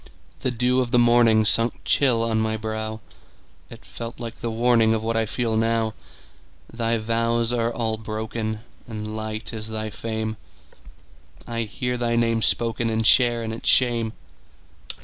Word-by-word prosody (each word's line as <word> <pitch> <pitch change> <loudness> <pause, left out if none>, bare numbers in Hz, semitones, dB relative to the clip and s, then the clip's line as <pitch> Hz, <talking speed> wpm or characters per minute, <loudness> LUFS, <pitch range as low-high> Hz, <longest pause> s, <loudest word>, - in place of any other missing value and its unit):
The - - -1
dew 125 +1 +1
of 125 - -2
the 120 - +2
morningSunk 115 -1 +4
chill 125 -5 +3
on 110 -1 +1
my 110 0 0
brow; 110 0 -4 0.7
It - - -12
felt 115 +1 -8
like 115 -2 -6
the 115 - -2
warningOf 115 -1 +3
what 115 +1 -2
I 115 -1 +1
feel 115 0 -1
now. 115 0 +1 0.8
Thy 115 0 0
vows 115 +1 0
are 115 -1 0
all 115 -2 -1
broken, 110 0 -4 0.3
And 110 -1 -5
light 110 +1 -4
is 110 -1 -4
thy 110 -1 -4
fame:I 110 - -8
hear 125 +4 -3
thy 120 -1 0
name 115 -1 +2
spokenAnd 115 -1 0
share 120 -1 +5
in 110 0 -4
its 115 - -1
shame. 120 -3 +3
115 Hz, 145 wpm, -24 LUFS, 110-120 Hz, 0.8 s, share